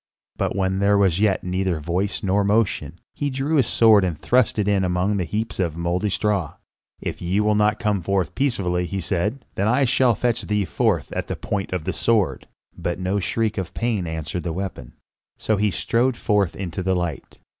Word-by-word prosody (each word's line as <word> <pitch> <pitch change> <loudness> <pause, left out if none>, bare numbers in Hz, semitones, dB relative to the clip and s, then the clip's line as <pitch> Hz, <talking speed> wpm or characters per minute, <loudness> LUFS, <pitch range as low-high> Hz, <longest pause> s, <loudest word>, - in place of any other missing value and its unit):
But - - -1
when 95 -1 0
there 100 +1 +4
was 95 -3 +3
yet 105 -3 +2
neither 90 -2 -1
voice 90 +6 -2
nor 100 +1 +2
motion, 100 -6 0
he 145 - -2
drew 140 +4 0
his 130 -6 +3
sword 110 -3 +5
and 85 -4 -1
thrust 125 +4 +2
it 105 -2 0
in 100 -2 +2
among 90 +3 +1
the 90 - -1
heaps 110 +6 -3
of 85 -4 -1
mouldy 85 +4 0
straw. 100 -4 -1 0.4
"If - - -5
ye 90 +3 0
will 105 0 +3
not 105 0 +2
come 105 -4 0
forth 95 -2 0
peaceably," 90 -10 0
he 95 - -3
said, 105 +7 -2
"then 120 +8 +2
shall 125 0 +3
I - - -4
fetch 120 +2 0
thee 105 -1 0
forth 95 - 0
at - - -3
the - - -3
point 100 -2 -3
of 90 -4 -2
the 95 - -2
sword." 95 +5 +1 0.3
But 85 - -3
no 95 +2 -1
shriek 110 +2 -1
of 95 - -6
pain 110 -7 -1
answered 80 +2 -4
the 85 -2 -3
weapon. 90 -9 -5 0.4
So 110 - 0
he 105 +1 +2
strode 120 +7 0
forth 100 -4 +1
into 90 -2 -4
the 95 0 +1
light. 85 -6 -4
100 Hz, 200 wpm, -23 LUFS, 90-105 Hz, 0.4 s, sword